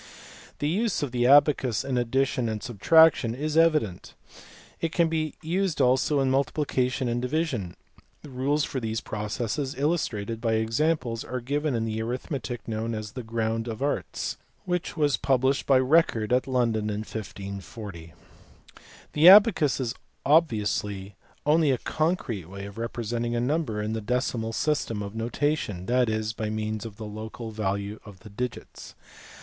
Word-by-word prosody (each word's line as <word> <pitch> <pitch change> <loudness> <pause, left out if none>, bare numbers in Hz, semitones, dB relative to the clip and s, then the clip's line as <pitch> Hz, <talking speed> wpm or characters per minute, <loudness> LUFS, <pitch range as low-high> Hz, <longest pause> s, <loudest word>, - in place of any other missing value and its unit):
The 145 - -1
use 200 +2 0
of 140 - -3
the 120 0 +2
abacus 140 -5 +4
in 135 -2 -1
addition 125 0 +1
and 105 -2 -4
subtraction 120 +1 +4
is 150 +3 -3
evident. 155 - +2 0.6
It 165 - -1
can 170 -1 +2
be 155 -1 -2
used 180 +1 -1
also 130 +3 +3
in 130 -1 +2
multiplication 135 -2 0
and 120 0 -1
division; 125 - -2 0.5
rules 145 +2 0
for 135 - -3
these 110 -2 -2
processes, 110 +6 -3
illustrated 115 -8 -1
by 115 -2 +1
examples, 115 +2 0
are 125 - -4
given 145 +3 -1
in 115 -1 0
the 110 0 -2
arithmetic 125 0 -4
known 115 +1 -2
as 110 -1 -5
The 125 +2 -6
Grounds 115 0 -2
of 115 +3 -4
Artes* 145 - -2 0.3
which 180 -1 -2
was 145 -3 +2
published 135 0 +1
by 135 -2 +5
Eecord 130 -6 +2
at 125 +1 +2
London 115 -5 +1
in 105 0 -2
1540. 100 -4 -8 1.0
The 155 +4 +8
abacus 195 - +6
is 125 -2 -1 0.3
obviously 105 - +1 0.3
only 155 +1 +4
a 130 - +3
concrete 155 - -1
way 100 +1 -7
of 100 +2 -9
representing 120 0 -2
a - - +1
number 130 -3 -1
in 110 +1 -2
the 110 - -3
decimal 115 0 -1
system 115 -5 -1
of 100 0 -7
notation, 115 - -2
that 125 +1 +2
is, 110 0 -1
by 110 -1 -3
means 110 +1 -3
of 100 -2 -12
the 110 - -7
local 110 +2 -7
value 100 0 -3
of 100 -4 -13
the 105 - -12
digits. 125 +4 -6
120 Hz, 155 wpm, -26 LUFS, 110-145 Hz, 1.0 s, The